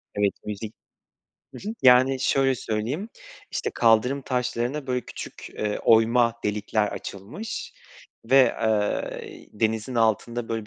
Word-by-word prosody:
Evet 100 -1 +2
müzik 105 +1 -5 0.8
Hı - - -7
hı. - - -2
Yani, 130 +1 +6
şöyle 135 -1 +2
söyleyeyim, 120 - -3 0.4
işte, - - -2
kaldırım 120 +4 +3
taşlarına, 125 +2 -2
böyle, 125 -1 0
küçük, - - -9
eee, 105 -1 -2
oyma 115 +1 +4
delikler 105 0 0
açılmış 105 - -7 0.5
ve, 130 +4 +3 0.3
eee, 105 -2 -2
denizin 110 +2 0
altında, 115 +1 0
böyle, 115 -2 -3
115 Hz, 120 wpm, -25 LUFS, 110-130 Hz, 0.8 s, Yani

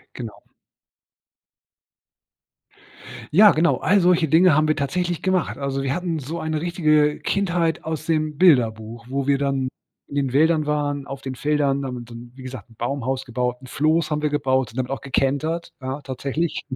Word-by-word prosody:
Genau. 115 -4 -6
Hm. - - -38 2.8
Ja, 210 +1 +9
genau 165 +2 +2
all 200 +1 +3
solche 175 -2 +3
Dinge 165 +2 +5
haben 155 +1 +3
wir 155 - +2
tatsächlich 175 +4 -2
gemacht. 185 -2 0
Also, 135 -1 -2
wir 135 0 -1
hatten 175 -3 -2
so 155 +5 -5
eine 155 -1 -2
richtige, 155 -4 +2
äh, - - -10
Kindheit 175 -4 0
aus 160 -1 -4
dem 155 -2 0
Bilderbuch, 115 -8 +2
wo 135 0 -2
wir 140 -1 +2
dann 135 -2 0 0.4
in - - -12
den 135 -3 -1
Wäldern 155 +1 +3
waren, 145 -1 -1
auf 135 0 -7
den 130 - -4
Feldern, 140 0 0
und 125 -3 -6
dann, 120 +1 -10
wie 130 - -11
gesagt, 130 -2 -8
'n 115 - -19
Baumhaus 130 +2 -2
gebaut, 125 0 -2
'n 130 - -14
Floß 155 +4 +1
haben 150 0 0
wir 150 - +1
gebaut, 130 -4 0
und 115 - -13
damit 130 0 -2
auch 135 - -3
gekentert, 140 +5 -1
ja, 130 +2 -4
tatsächlich. 140 +5 -3
145 Hz, 180 wpm, -22 LUFS, 130-160 Hz, 2.8 s, Ja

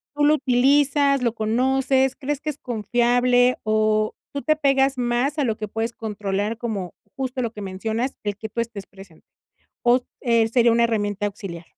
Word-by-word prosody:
¿tú 295 - 0
lo 305 +1 +5
utilizas, 275 +1 +3
lo 235 -2 0
conoces, 260 +4 +1
crees 290 0 -3
que 305 - -3
es 295 - -5
confiable?, 245 +1 +2
o, 215 0 +1 0.2
¿tú 280 - -3
te 310 +1 +2
pegas 275 -2 +2
más 245 +5 0
a 290 - +1
lo 225 -3 -1
que 215 - -4
puedes 225 +2 -3
controlar 210 0 -3
como, 205 -7 -4 0.2
justo 260 -1 -3
lo 230 - -2
que 210 - -9
mencionas, 220 +7 -3
el 205 -1 -3
que 220 0 -7
tú 235 - -2
estés 220 -4 -7
presente?, 195 -4 -16 0.6
o 240 +1 +5
s 255 - -4 0.2
eh, 230 -3 +2
¿sería 235 0 +3
una 235 0 +3
herramienta 205 -2 -1
auxiliar? 185 -4 -7
235 Hz, 185 wpm, -23 LUFS, 215-265 Hz, 0.6 s, lo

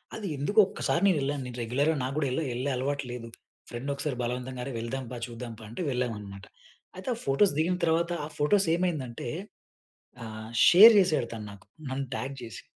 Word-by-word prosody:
అది 210 -3 -5
ఎందుకొ 205 +10 +2
ఒక్కసారి 175 - -1
నే 195 - +6
వెళ్ళాను. 140 0 -1
నేను 125 -1 -8
రెగ్యులర్‌గా 140 +7 +1
నాకు 135 +2 -3
గూడా 145 -3 +1
ఎల్లే 155 +5 -1
ఎళ్ళే 130 +3 -1
అలవాటు 140 +2 -1
లేదు. 120 -1 -6 0.4
ఫ్రెండ్ 120 +4 -6
నొకసారి 140 -1 -3
బలవంతంగా 125 +1 -4
"అరే 135 - -5
వెళ్దాంపా. 125 +1 -5
చూద్దాంపా" 115 -1 -8
అంటే 115 +10 -6
వెళ్ళామనమాట. 105 -6 -4 0.5
అయితే 185 +7 -6
ఆ - - -11
ఫోటోస్ 140 +7 +3
దిగిన 170 +4 +2
తర్వాత 170 +1 +1
ఆ - - -5
ఫోటోస్ 185 +6 +3
ఏమైందంటే, 150 -10 -2 1.0
ఆహ్, 110 0 -8 0.2
షేర్ 215 +6 +10
చేసాడు 160 -11 +2
తను 105 -2 -6
నాకు. 100 - -15 0.2
నన్ను 135 +1 -2
ట్యాగ్ 135 +1 -4
చేసి. 115 -5 -9
135 Hz, 175 wpm, -28 LUFS, 120-160 Hz, 1.0 s, షేర్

